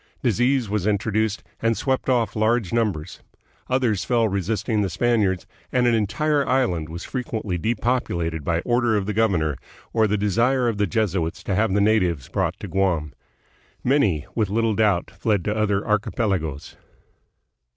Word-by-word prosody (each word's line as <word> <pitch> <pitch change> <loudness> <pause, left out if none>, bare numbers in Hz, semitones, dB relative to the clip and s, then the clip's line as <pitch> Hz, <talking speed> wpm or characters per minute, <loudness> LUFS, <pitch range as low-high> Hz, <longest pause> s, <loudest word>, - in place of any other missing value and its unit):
Disease 125 +1 +2
was 105 -1 -1
introduced 105 0 0 0.2
and 115 -1 +1
swept 135 -1 -1
off 115 -5 +1
large 110 -1 +1
numbers. 100 -9 -1 0.5
Others 125 -7 +1
fell 115 -2 +2
resisting 105 +3 -1
the 100 - 0
Spaniards, 100 -3 +1 0.3
and 125 -1 +2
an 120 - +4
entire 140 +8 +1
island 105 -12 +1
was 85 +2 -6
frequently 110 -7 -3
depopulated 90 - -1
by 85 +2 0
order 120 -1 +2
of 100 - -1
the 105 - -2
governor, 90 -10 +1 0.4
or 110 -1 +3
the 105 +1 0
desire 120 +6 +2
of 110 -3 -1
the 105 - +2
Jesuits 95 -7 -1
to 100 - -2
have 105 +2 +2
the 105 - +3
natives 90 -10 +1
brought - - -1
to - - -5
Guam. 90 -7 0 0.7
Many, 105 - +2
with 110 -4 0
little 115 +2 +1
doubt, 100 -5 +1
fled 105 -5 -1
to 105 - 0
other 105 -2 0
archipelagoes. 100 - -1
105 Hz, 155 wpm, -23 LUFS, 95-115 Hz, 0.7 s, an